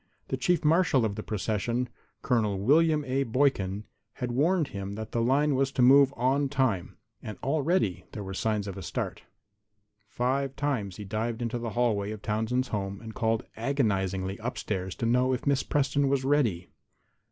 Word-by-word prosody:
The -, -, 0 dB
chief 175 Hz, -3 st, +1 dB
marshal 155 Hz, -6 st, +4 dB
of 105 Hz, -, -1 dB
the 110 Hz, -, -5 dB
procession, 110 Hz, +4 st, -1 dB, 0.4 s
Col. 110 Hz, -6 st, +1 dB
William 150 Hz, +7 st, +3 dB
A. 135 Hz, +1 st, 0 dB
Boykin, 110 Hz, -6 st, +1 dB, 0.3 s
had 125 Hz, -2 st, -4 dB
warned 155 Hz, +5 st, +2 dB
him 100 Hz, 0 st, -5 dB
that 110 Hz, +1 st, -6 dB
the 115 Hz, -, 0 dB
line 140 Hz, +5 st, +3 dB
was 135 Hz, 0 st, +1 dB
to 125 Hz, -, +2 dB
move 135 Hz, +2 st, +7 dB
on 135 Hz, +3 st, +1 dB
time, 130 Hz, -10 st, 0 dB, 0.2 s
and 110 Hz, -3 st, -7 dB
already 140 Hz, -, +1 dB
there 105 Hz, -, -6 dB
were 95 Hz, 0 st, -6 dB
signs 105 Hz, +1 st, -1 dB
of 100 Hz, -1 st, -6 dB
a -, -, -6 dB
start. 90 Hz, -, -4 dB, 0.9 s
Five 135 Hz, +4 st, -1 dB
times 125 Hz, -10 st, -2 dB
he 105 Hz, -, -7 dB
dived 110 Hz, +3 st, -2 dB
into 120 Hz, 0 st, -2 dB
the 115 Hz, 0 st, -3 dB
hallway 105 Hz, -5 st, +1 dB
of 110 Hz, -1 st, -7 dB
Townsend's 115 Hz, +4 st, -1 dB
home 100 Hz, -2 st, -3 dB
and 110 Hz, 0 st, -9 dB
called 115 Hz, -1 st, 0 dB
agonizingly 100 Hz, -7 st, -1 dB
upstairs 100 Hz, -5 st, -3 dB
to -, -, -3 dB
know 125 Hz, +2 st, +3 dB
if 125 Hz, -, -3 dB
Miss 140 Hz, -1 st, +2 dB
Preston 140 Hz, 0 st, +1 dB
was 135 Hz, -1 st, +1 dB
ready. 120 Hz, -12 st, +1 dB
120 Hz, 175 wpm, -28 LUFS, 105-135 Hz, 0.9 s, move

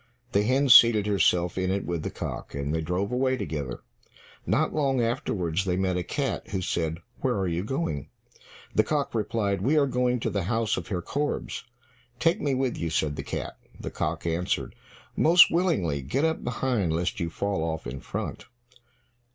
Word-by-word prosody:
The 100 Hz, -, +3 dB
hen 130 Hz, +6 st, +2 dB
seated 115 Hz, -4 st, +8 dB
herself 90 Hz, -3 st, +2 dB
in 95 Hz, 0 st, 0 dB
it 100 Hz, +1 st, -1 dB
with 85 Hz, -2 st, -2 dB
the -, -, -3 dB
cock, -, -, -6 dB
and 70 Hz, +1 st, -2 dB
they 80 Hz, -, 0 dB
drove 90 Hz, +6 st, -1 dB
away 130 Hz, +1 st, +1 dB
together. 75 Hz, -, -4 dB, 0.6 s
Not -, -, +1 dB
long 135 Hz, -4 st, +1 dB
afterwards 105 Hz, -, 0 dB
they 90 Hz, -2 st, 0 dB
met 95 Hz, -1 st, +1 dB
a 90 Hz, -, 0 dB
cat -, -, -2 dB
who 95 Hz, -, -2 dB
said, 80 Hz, -3 st, -1 dB, 0.2 s
"Where 130 Hz, -2 st, 0 dB
are 95 Hz, -1 st, 0 dB
you 85 Hz, +1 st, -1 dB
going?" 110 Hz, -, -3 dB, 0.6 s
The -, -, +4 dB
cock 145 Hz, -2 st, -1 dB
replied, 105 Hz, -3 st, 0 dB
"We 140 Hz, +9 st, +2 dB
are 145 Hz, -, +5 dB
going 125 Hz, -1 st, +1 dB
to -, -, -1 dB
the 100 Hz, -4 st, -1 dB
house 110 Hz, +1 st, +1 dB
of -, -, -5 dB
Herr 90 Hz, -4 st, -3 dB
Korbes." 145 Hz, +2 st, -3 dB, 0.5 s
"Take 165 Hz, +6 st, +2 dB
me 140 Hz, -2 st, +1 dB
with 130 Hz, -1 st, -1 dB
you," 85 Hz, -, -1 dB
said 75 Hz, -2 st, 0 dB
the -, -, -4 dB
cat. -, -, -5 dB, 0.2 s
The -, -, -5 dB
cock -, -, -3 dB
answered, 85 Hz, +2 st, -1 dB, 0.4 s
"Most 170 Hz, +2 st, +7 dB
willingly, 140 Hz, -, +1 dB
get 105 Hz, -, 0 dB
up 160 Hz, 0 st, -1 dB
behind, 120 Hz, -7 st, 0 dB
lest 85 Hz, +2 st, -1 dB
you 85 Hz, -, -1 dB
fall 100 Hz, 0 st, -2 dB
off 80 Hz, -1 st, -3 dB
in 65 Hz, +3 st, -5 dB
front. -, -, -5 dB
100 Hz, 185 wpm, -27 LUFS, 85-130 Hz, 0.6 s, seated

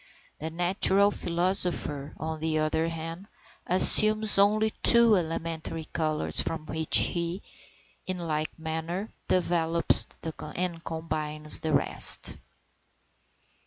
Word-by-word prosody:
The 160 Hz, -, -7 dB
natural 190 Hz, +4 st, -1 dB
philosopher, 175 Hz, -6 st, -3 dB
on 160 Hz, 0 st, -8 dB
the 160 Hz, 0 st, -4 dB
other 155 Hz, +1 st, -3 dB
hand, 165 Hz, +3 st, -10 dB, 0.4 s
assumes 215 Hz, +3 st, +6 dB
only 215 Hz, +2 st, 0 dB
two 235 Hz, -2 st, +5 dB
elementary 165 Hz, -2 st, -6 dB
colours, 155 Hz, -2 st, -2 dB
from 160 Hz, -1 st, -6 dB
which 160 Hz, 0 st, 0 dB
he, 170 Hz, +2 st, -2 dB, 0.6 s
in 185 Hz, -1 st, -6 dB
like 155 Hz, -3 st, -7 dB
manner, 160 Hz, +5 st, -8 dB, 0.2 s
developes 170 Hz, -2 st, +3 dB, 0.5 s
and 170 Hz, -2 st, -7 dB
combines 155 Hz, -2 st, 0 dB
the 160 Hz, -1 st, -6 dB
rest. 140 Hz, -, +4 dB
165 Hz, 100 wpm, -24 LUFS, 160-185 Hz, 0.6 s, assumes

